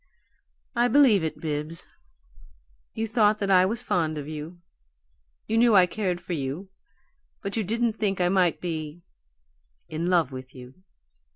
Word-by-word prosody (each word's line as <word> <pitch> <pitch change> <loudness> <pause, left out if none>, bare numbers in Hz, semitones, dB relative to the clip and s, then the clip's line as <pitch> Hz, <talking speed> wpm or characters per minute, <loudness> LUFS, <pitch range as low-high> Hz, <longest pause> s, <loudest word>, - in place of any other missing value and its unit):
"I 240 +1 +3
believe 245 - +5
it, 160 - -3
Bibbs. 155 +1 -4 1.1
You 225 - -1
thought 215 -1 +3
that 200 -2 -1
I 185 0 +6
was 235 +4 -3
fond 160 -7 0
of 145 -1 -6
you; 155 +3 -7 0.9
you 225 +1 +1
knew 235 -2 +5
I 185 -2 +7
cared 180 -2 -2
for 175 0 -6
you 150 +6 -4 0.7
but 200 - -4
you 225 - 0
didn't 230 +3 0
think 205 -3 -1
I 180 - +3
might 180 -2 +2
be 160 -1 -5 0.9
in 165 +2 -3
love 170 -6 +2
with 130 0 -9
you. 125 0 -11
180 Hz, 155 wpm, -26 LUFS, 155-215 Hz, 1.1 s, I